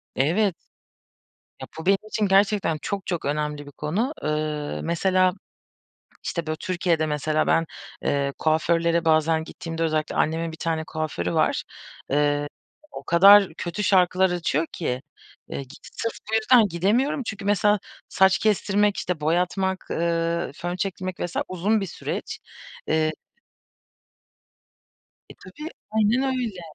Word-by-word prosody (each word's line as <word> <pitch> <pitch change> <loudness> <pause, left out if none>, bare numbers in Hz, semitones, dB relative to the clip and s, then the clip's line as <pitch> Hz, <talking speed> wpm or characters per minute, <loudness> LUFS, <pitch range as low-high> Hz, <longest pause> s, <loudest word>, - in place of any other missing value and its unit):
Evet. 175 +8 +2 1.1
Ya, - - -6
bu 160 - -7
benim 195 +1 +5
için 215 -1 0
gerçekten 195 -4 +3
çok, 200 -2 -4
çok 175 -3 -3
önemli 150 0 -2
bir - - -10
konu. 195 - -2
Iıı, 150 -1 -2
mesela, 185 +2 +2 0.9
işte 170 -2 -3
böyle 155 - -1
Türkiye'de 175 -2 0
mesela 155 +1 0
ben, 165 - +3 0.4
eee, 140 -1 0
kuaförlere 165 +1 +1
bazen 160 0 +3
gittiğimde 165 0 -5
özellikle 155 -1 -1
annemin 165 +1 0
bir 160 - -10
tane 160 -1 -1
kuaförü 145 - -3
var. - - +1 0.5
Iıı, 145 0 +2 0.4
o - - -8
kadar 195 +1 +7
kötü 175 +5 -3
şarkılar 185 -1 +4
açıyor 165 -3 0
ki, 125 -7 -3 0.5
iii, 135 - -6
k 130 - -13 0.2
sırf 230 -1 -3 0.2
bu - - +2
yüzden 220 0 +5
gidemiyorum. 210 - +1
Çünkü 200 -3 -6
mesela 205 +1 +3 0.3
saç 190 0 +4
kestirmek, 205 -1 +2
işte 175 -4 -3
boyatmak, 180 +4 0
ııı, 170 0 0
fön 175 +2 -4
çektirmek 185 -1 -4
vs. 175 - -4
uzun 200 +4 0
bir - - -1
süreç. - - -5 0.5
Eee 155 0 +2 2.2
E, - - -10
tabii 300 - -9 0.2
aynen 220 +4 +2
öyle. 250 -8 -2
170 Hz, 130 wpm, -24 LUFS, 155-200 Hz, 2.2 s, kadar